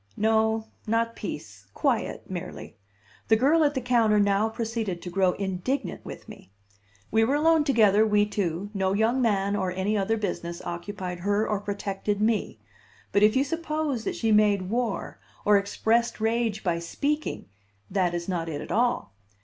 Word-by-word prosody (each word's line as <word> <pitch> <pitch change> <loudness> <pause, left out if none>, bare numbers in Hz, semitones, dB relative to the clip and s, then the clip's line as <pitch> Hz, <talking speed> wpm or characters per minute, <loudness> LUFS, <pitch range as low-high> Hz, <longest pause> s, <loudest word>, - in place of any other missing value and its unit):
No, 220 0 +2 0.2
not 230 +1 0
peace; 100 - -7
quiet, - - -1
merely; - - -7 0.5
the 220 - +5
girl 290 +8 +4
at 290 -1 +2
the 260 - 0
counter 230 -4 +3
now 205 +2 +2
proceeded 225 -5 -3
to 180 - -6
grow 185 0 +2
indignant 195 +8 -3
with - - -9
me. - - -12 0.6
We 225 +1 +4
were 265 +6 +2
alone 320 +1 +4
together, 215 -6 +4
we 210 -1 +3
two; 200 -1 -3
no 190 -1 0
young 225 +5 +2
man, 200 -3 +1
or 190 -2 -1
any 190 +4 -1
other 210 +2 +1
business, 170 -5 -3
occupied 180 0 -5
her 205 +4 +1
or 210 -2 0
protected 200 0 -3
me. 215 0 0 0.5
But 200 - +3
if 210 +2 +5
you 265 - +4
suppose 305 -4 -2
that - - -2
she 225 - 0
made 205 -3 +3
war, 230 -5 -2 0.3
or 205 -1 +6
expressed 225 +4 0
rage 225 -1 0
by 170 -2 0
speaking, 290 - -2 0.5
that 180 -3 +1
is 170 0 -4
not 170 -3 -2
it 145 -2 -4
at - - -7
all. 240 - +1
210 Hz, 165 wpm, -26 LUFS, 195-230 Hz, 0.6 s, or